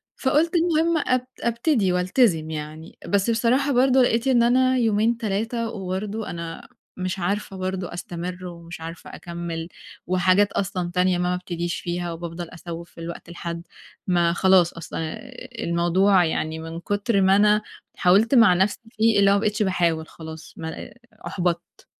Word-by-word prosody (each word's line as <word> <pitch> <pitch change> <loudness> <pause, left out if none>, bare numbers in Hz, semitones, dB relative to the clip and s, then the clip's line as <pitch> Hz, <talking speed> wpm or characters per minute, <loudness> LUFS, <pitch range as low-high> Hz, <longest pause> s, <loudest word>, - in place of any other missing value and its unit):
فقُلت 300 +5 +2
المهم 330 -1 +2
أب 255 0 +1
أبتدي 235 - +1
وألتزم 180 -3 +2
يعني، 155 +1 -7
بس 200 +2 +1
بصراحة 245 +5 +2
برضه 260 +1 +4
لقيت 235 0 +2
إن 245 -3 +4
أنا 255 +2 +3
يومين 225 0 +2
3 225 +2 -2
وبرضه 205 +1 -4
أنا 170 -1 -7 0.3
مش 185 +1 -3
عارفة 195 +2 -2
برضه 185 -1 -3
أستمر 180 +1 -6
ومش 170 -1 -9
عارفة 165 +1 -8
أكمّل، 170 -1 -5 0.4
وحاجات 185 +3 +3
أصلًا 185 -3 -2
تانية 180 0 +2
ما 180 0 0
بابتديش 175 -1 -4
فيها 175 0 -3
وبافضل 170 0 -6
أسوّف 170 -1 -8
في 165 - -12
الوقت 170 0 -7
لحَدّ 170 0 -6 0.4
ما 175 -2 +3
خلاص 185 -2 +4
أصلًا 165 -1 -7
آآ، 165 +11 -6 0.3
الموضوع 175 +2 +3
يعني 160 0 -2
من 165 +1 -6
كُتر 205 +3 0
ما 190 +1 +5
أنا 210 +1 +4 0.4
حاولت 205 +8 +4
مع 225 -6 +7
نَفْسي 190 +3 +1
فيه 220 -1 +3
اللي 200 0 +5
هو - - +5
ما - - +2
بقيتش 215 +1 0
باحاول 170 -4 0
خلاص، 160 -1 -10
ما 160 - -5
آآ، - - -10 0.3
أُحبَطت. 175 -2 -3
185 Hz, 155 wpm, -23 LUFS, 170-225 Hz, 0.4 s, مع